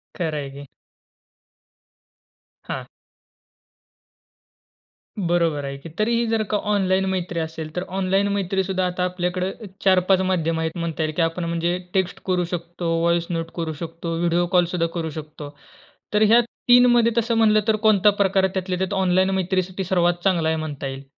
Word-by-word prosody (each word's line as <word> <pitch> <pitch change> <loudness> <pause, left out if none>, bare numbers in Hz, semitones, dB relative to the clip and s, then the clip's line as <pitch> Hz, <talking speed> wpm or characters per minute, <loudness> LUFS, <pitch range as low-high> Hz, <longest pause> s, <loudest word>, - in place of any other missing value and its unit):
खरं 160 -4 -2
आहे 140 -1 -5
की. 140 +1 -10 2.0
हां. - - -5 2.3
बरोबर 170 -5 0
आहे 140 0 -5
की. 140 +4 -10
तरी 215 +8 0
ही 235 - +1
जर 225 -1 +1
का 210 - +2
ऑनलाईन 190 -1 +2
मैत्री 175 -2 -2
असेल, 160 -1 -5
तर 180 - -1
ऑनलाईन 195 +1 +1
मैत्रीसुद्धा 190 -1 -1
आता 180 0 -2
आपल्याकडे, 180 +1 -2
अ, 220 - -11 0.2
4-5 185 0 +4
माध्यम 165 -3 0
आहेत 160 +1 -3
म्हणता 165 -2 -2
येईल. 155 - -2
की 170 - +1
आपण 165 +2 0
म्हणजे 170 +1 -1 0.2
टेक्स्ट 190 -2 0
करू 180 -2 +1
शकतो, 170 -1 -3
व्हॉइस 170 0 +1
नोट 165 -1 -3
करू 165 -2 -3
शकतो, 165 0 -5
व्हिडिओ 175 0 +2
कॉलसुद्धा 175 -1 +1
करू 160 -1 -2
शकतो. 150 -1 -9 0.6
तर 210 +1 +4
ह्या 235 +3 +6
3मध्ये 240 0 +4
तसं 230 0 +1
म्हटलं 215 -1 +5
तर 220 - +4
कोणता 210 -1 +5
प्रकार 190 0 +3
त्यातल्या 185 -1 -2
त्यात 190 +2 -2
ऑनलाईन 185 +1 +3
मैत्रीसाठी 185 +1 -1
सर्वात 175 -1 +1
चांगला 175 -5 +2
आहे 160 - 0
म्हणता 145 -3 -4
येईल? 135 +1 -7
180 Hz, 160 wpm, -22 LUFS, 165-190 Hz, 2.3 s, ह्या